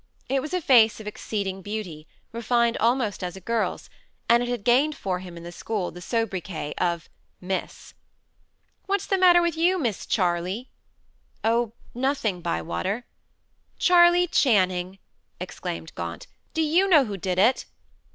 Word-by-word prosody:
It 270 Hz, 0 st, +1 dB
was 305 Hz, -, -6 dB
a 365 Hz, -, -1 dB
face 230 Hz, -7 st, +5 dB
of 215 Hz, -, -9 dB
exceeding 200 Hz, -2 st, -4 dB
beauty, 185 Hz, -7 st, -6 dB, 0.2 s
refined 235 Hz, 0 st, +1 dB
almost 230 Hz, -5 st, 0 dB
as 180 Hz, 0 st, -4 dB
a -, -, -8 dB
girl's, 230 Hz, +4 st, -2 dB, 0.4 s
and 235 Hz, +1 st, +5 dB
it 245 Hz, -, -2 dB
had 245 Hz, -4 st, -3 dB
gained 270 Hz, +7 st, +3 dB
for 185 Hz, -7 st, -3 dB
him 180 Hz, -2 st, -10 dB
in 170 Hz, -, -10 dB
the 175 Hz, -, -8 dB
school 200 Hz, 0 st, -3 dB
the 175 Hz, -, -11 dB
sobriquet 190 Hz, -7 st, -3 dB
of 170 Hz, -1 st, -1 dB, 0.3 s
"Miss." 185 Hz, +1 st, -5 dB, 0.9 s
"What's 400 Hz, 0 st, 0 dB
the 390 Hz, -, 0 dB
matter 350 Hz, -1 st, +6 dB
with 340 Hz, -2 st, 0 dB
you, 350 Hz, +3 st, +2 dB
Miss 235 Hz, -, -2 dB
Charley?" 185 Hz, +5 st, -1 dB, 0.7 s
"Oh, 230 Hz, 0 st, +1 dB, 0.2 s
nothing, 245 Hz, -7 st, -1 dB
Bywater." 85 Hz, -, -2 dB, 0.7 s
"Charley 350 Hz, 0 st, +5 dB
Channing," 185 Hz, -, +2 dB, 0.4 s
exclaimed 80 Hz, -1 st, -6 dB
Gaunt, 85 Hz, -1 st, -6 dB, 0.3 s
"do 320 Hz, -, +2 dB
you 340 Hz, +6 st, +3 dB
know 305 Hz, -7 st, +6 dB
who 205 Hz, -3 st, -5 dB
did 185 Hz, -1 st, -3 dB
it?" 230 Hz, +7 st, +3 dB
220 Hz, 150 wpm, -25 LUFS, 180-265 Hz, 0.9 s, matter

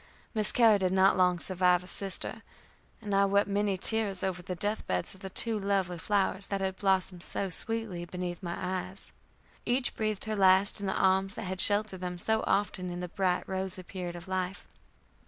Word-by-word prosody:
Miss 215 Hz, -2 st, +3 dB
Carrie 225 Hz, -4 st, +5 dB
did 185 Hz, -1 st, 0 dB
not 190 Hz, +1 st, +4 dB
long 180 Hz, -1 st, +3 dB
survive 180 Hz, 0 st, +3 dB
her -, -, -12 dB
sister, 195 Hz, +1 st, -4 dB, 0.6 s
and 205 Hz, -1 st, -4 dB
I 200 Hz, 0 st, +4 dB
wept 200 Hz, +1 st, +2 dB
many 200 Hz, -1 st, 0 dB
tears 205 Hz, -2 st, +3 dB
over 185 Hz, -2 st, -2 dB
the 180 Hz, +1 st, -5 dB
death 210 Hz, +4 st, -2 dB
beds 90 Hz, -1 st, -2 dB
of 190 Hz, -, -16 dB
the 190 Hz, -, -6 dB
two 225 Hz, +3 st, -1 dB
lovely 195 Hz, -3 st, -1 dB
flowers 195 Hz, +1 st, +1 dB
that 200 Hz, -, -2 dB
had 190 Hz, -1 st, -3 dB
blossomed 190 Hz, -2 st, 0 dB
so 195 Hz, +2 st, -2 dB
sweetly 215 Hz, -2 st, 0 dB
beneath 175 Hz, 0 st, -5 dB
my 170 Hz, -1 st, -4 dB
eyes. 185 Hz, +1 st, -5 dB, 0.5 s
Each 250 Hz, +1 st, 0 dB
breathed 215 Hz, -2 st, -2 dB
her 220 Hz, 0 st, -2 dB
last 190 Hz, +1 st, +4 dB
in 200 Hz, -, -4 dB
the 190 Hz, -, -1 dB
arms 190 Hz, +1 st, +2 dB
that 225 Hz, -, -6 dB
had 185 Hz, 0 st, -1 dB
sheltered 205 Hz, -2 st, +3 dB
them 180 Hz, -1 st, -4 dB
so 220 Hz, +5 st, 0 dB
often 190 Hz, -2 st, -1 dB
in 175 Hz, 0 st, -5 dB
the 180 Hz, 0 st, -5 dB
bright 180 Hz, 0 st, -1 dB
rosy 190 Hz, 0 st, -2 dB
period 180 Hz, -1 st, -6 dB
of 175 Hz, +1 st, -10 dB
life. 185 Hz, 0 st, -3 dB
190 Hz, 195 wpm, -29 LUFS, 180-205 Hz, 0.6 s, Carrie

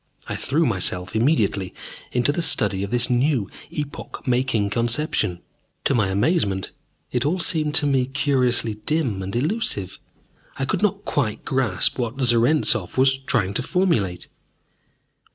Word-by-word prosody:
I -, -, -3 dB
threw 155 Hz, +5 st, +1 dB
myself 95 Hz, -4 st, 0 dB
immediately 110 Hz, -, +1 dB, 0.4 s
into 125 Hz, +3 st, +2 dB
the 160 Hz, -, -2 dB
study 105 Hz, -, +1 dB
of 100 Hz, -, -3 dB
this 120 Hz, +1 st, +1 dB
new, 125 Hz, -3 st, +1 dB, 0.2 s
epoch 145 Hz, -1 st, -6 dB
making 125 Hz, -5 st, +1 dB
conception. 115 Hz, -, 0 dB, 0.4 s
To -, -, +2 dB
my 110 Hz, -6 st, +2 dB
amazement, 100 Hz, -, 0 dB, 0.4 s
it 125 Hz, -1 st, 0 dB
all 155 Hz, +6 st, +1 dB
seemed 155 Hz, -4 st, +1 dB
to 145 Hz, -, +3 dB
me 135 Hz, -3 st, +2 dB
curiously 130 Hz, -5 st, +1 dB
dim 140 Hz, -11 st, 0 dB
and 95 Hz, +3 st, -5 dB
elusive. 140 Hz, -, -1 dB, 0.6 s
I 135 Hz, -, -1 dB
could -, -, -1 dB
not 210 Hz, -3 st, 0 dB
quite 115 Hz, -7 st, -1 dB
grasp 130 Hz, -6 st, 0 dB
what 120 Hz, +2 st, -3 dB
Zarentzov 120 Hz, -, +3 dB
was 130 Hz, +1 st, +4 dB
trying 110 Hz, -7 st, 0 dB
to 125 Hz, -, +1 dB
formulate. 135 Hz, -, 0 dB
125 Hz, 140 wpm, -22 LUFS, 105-145 Hz, 0.6 s, was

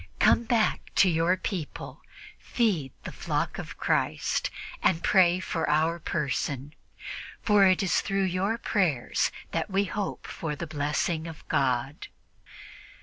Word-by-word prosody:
Come 235 Hz, -, +4 dB
back 230 Hz, -2 st, +2 dB
to 195 Hz, -, +6 dB
your 165 Hz, +3 st, +2 dB
people, 185 Hz, -5 st, -5 dB, 0.4 s
feed 185 Hz, -, 0 dB
the -, -, -6 dB
flock -, -, -2 dB
of -, -, -7 dB
Christ -, -, 0 dB, 0.3 s
and 170 Hz, -2 st, +2 dB
pray 180 Hz, -2 st, +5 dB
for 165 Hz, -4 st, -2 dB
our 160 Hz, +3 st, +2 dB
person, 145 Hz, -2 st, -2 dB, 0.7 s
for 205 Hz, -2 st, +5 dB
it 185 Hz, +2 st, +3 dB
is 190 Hz, -, +2 dB
through 195 Hz, -1 st, 0 dB
your 190 Hz, +4 st, 0 dB
prayers 175 Hz, -, +1 dB, 0.2 s
that -, -, -1 dB
we 195 Hz, +1 st, +2 dB
hope 200 Hz, +1 st, -4 dB
for 155 Hz, -3 st, -4 dB
the 170 Hz, -, -5 dB
blessing 155 Hz, +2 st, -1 dB
of 165 Hz, -2 st, -10 dB
God." 130 Hz, +1 st, 0 dB
170 Hz, 135 wpm, -27 LUFS, 150-195 Hz, 0.7 s, to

